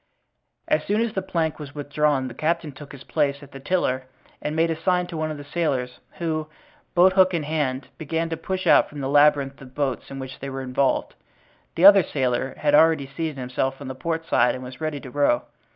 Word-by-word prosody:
As 305 -1 +2
soon 210 +2 0
as 230 -2 -1
the 190 - -1
plank 165 -5 -2
was 145 -1 -9
withdrawn 145 -2 0
the 125 - -7
captain 160 +3 -1
took 140 +1 -12
his 140 -1 -11
place 145 -2 -1
at 140 - -14
the 135 - -9
tiller 130 -5 0 0.4
and 150 - -3
made 165 +1 +2
a - - 0
sign 180 +1 +2
to 175 -1 -8
one 155 0 -2
of 155 - -5
the 145 - -8
sailors, 140 -5 -2
who, 155 -2 -2 0.5
boat 185 +2 +6
hook 185 -1 +4
in 160 - -1
hand, 145 -4 -2
began 165 +1 -2
to 165 - -2
push 185 +3 -4
out - - +5
from 145 -1 -8
the 135 - -2
labyrinth 145 -1 +3
of 130 -1 -13
boats 140 -4 -2
in 135 - -7
which 130 -1 -7
they 140 - -5
were 135 0 -5
involved. 130 +1 0 0.6
The 175 - +3
other 200 -1 +10
sailor 130 -4 -1
had 145 -1 +1
already 155 -1 +5
seated 160 -3 -3
himself 130 +1 -2
on 140 -2 -7
the - - -4
port 165 +5 -3
side 125 +2 +3
and 130 - -7
was 130 +4 -10
ready 155 -2 -2
to 130 - -10
row. 140 -4 +2
150 Hz, 225 wpm, -24 LUFS, 135-165 Hz, 0.6 s, other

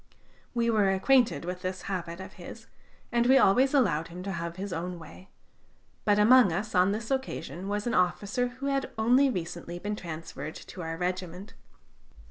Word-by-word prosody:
We 235 -1 +2
were 210 -3 +3
acquainted 240 +1 +3
with 180 +1 -5
this 185 0 -4
habit 175 -3 -4
of 190 - -9
his, - - -10 0.5
and 240 0 +2
we 265 +1 +7
always 260 +3 +5
allowed 175 - +2
him 180 +2 -8
to 195 - -4
have 170 -2 -4
his 195 0 -5
own 175 +2 -4
way; 170 +3 -13 0.8
but 205 -1 +4
among 225 -1 +6
us 200 +6 -3
on 185 +1 +4
this 225 +4 -4
occasion 260 -8 -3
was 205 +1 -2
an 240 - -1
officer 205 +7 +1
who 255 +3 -8
had 275 -1 0
only 250 +5 +4
recently 175 -4 -5
been 205 +4 -3
transferred 160 -4 -7
to 180 - -9
our 165 -1 -4
regiment. 180 +2 -4
195 Hz, 175 wpm, -28 LUFS, 175-235 Hz, 0.8 s, we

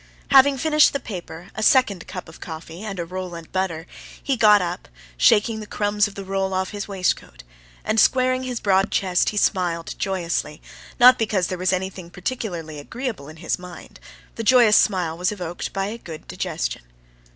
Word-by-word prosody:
Having 275 0 +6
finished 305 +2 +4
the 280 - -1
paper, 175 -6 -8
a - - -5
second 215 -6 +3
cup 180 - -7
of 160 - -13
coffee 160 +2 -8
and 205 -3 -5
a 170 - -2
roll 180 0 -6
and 165 -1 -10
butter, 175 -3 -2 0.4
he 275 - +1
got 210 -3 +6
up, 180 -1 -4 0.3
shaking 210 - +3
the 215 - -8
crumbs 205 0 +1
of 205 - -12
the 200 - -6
roll 195 0 -1
off 185 0 -1
his 205 -1 -5
waistcoat; 185 - -2 0.4
and, 220 +1 +1
squaring 255 +1 +3
his 250 -2 -4
broad 195 0 +2
chest, 185 -3 +1
he 210 - -5
smiled 175 -5 0
joyously: 175 -5 -2 0.4
not 250 +1 +8
because 210 -5 0
there 185 - -3
was 185 0 +1
anything 185 -1 -3
particularly 175 - -5
agreeable 220 - -5
in 155 - -11
his 165 +2 -2
mind—the 180 +5 -11
joyous 235 -2 +6
smile 180 -7 +2
was 180 +3 0
evoked 175 -4 -5
by 195 0 -2
a 220 +4 -5
good 160 -6 -10
digestion. - - -3
190 Hz, 180 wpm, -22 LUFS, 175-220 Hz, 0.4 s, not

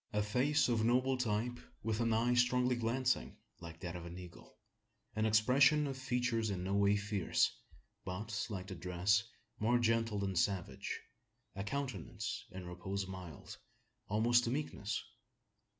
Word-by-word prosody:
A 105 0 +2
face 130 +8 +2
of 115 -3 +2
noble 130 +3 +3
type, 120 0 -1 0.2
with 110 0 -1
an 115 -1 +2
eye 115 +2 +3
strongly 125 +1 +3
glancing, 125 +2 0 0.2
like 85 -1 -10
that 90 -1 -4
of 85 - -6
an 85 +1 -8
eagle; 90 -1 -12 0.6
an 110 0 +2
expression 130 +8 +5
of 135 -1 -3
features 125 -4 0
in 90 -3 -2
no 95 +1 -1
way 100 0 +4
fierce, 105 -2 +1 0.5
but, 105 +4 -3
like 95 -4 -4
the 95 - -6
dress, 90 +2 +2 0.4
more 120 +3 +3
gentle 115 -2 +2
than 100 -1 -1
savage; 90 +1 -1 0.6
a 100 - -3
countenance, 130 - -4
in 95 0 -8
repose 95 +3 -4
mild 95 -5 -8 0.5
almost 120 +4 +4
to - - 0
meekness. 125 -6 -2
110 Hz, 150 wpm, -35 LUFS, 95-120 Hz, 0.6 s, expression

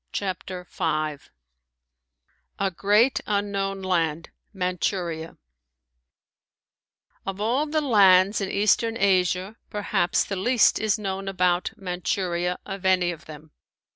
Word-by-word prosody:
CHAPTER 185 -2 -4
V 155 -4 -2 1.4
A 195 -1 0
GREAT 210 +8 +3
UNKNOWN 200 -1 -1
LAND 165 -3 -1 0.2
MANCHURIA 180 -3 -3 1.9
Of 195 0 -5
all 245 +8 +1
the 310 +1 0
lands 200 -6 +5
in 195 - -2
eastern 225 +3 +2
Asia 190 +1 +1
perhaps 205 -4 0
the 200 - -4
least 235 +4 +3
is 220 -1 +1
known 195 -2 -4
about 180 -2 +1
Manchuria 180 -1 -2
of 195 -1 -7
any 185 -2 +3
of 165 - -10
them. 155 0 -12
190 Hz, 105 wpm, -25 LUFS, 180-205 Hz, 1.9 s, lands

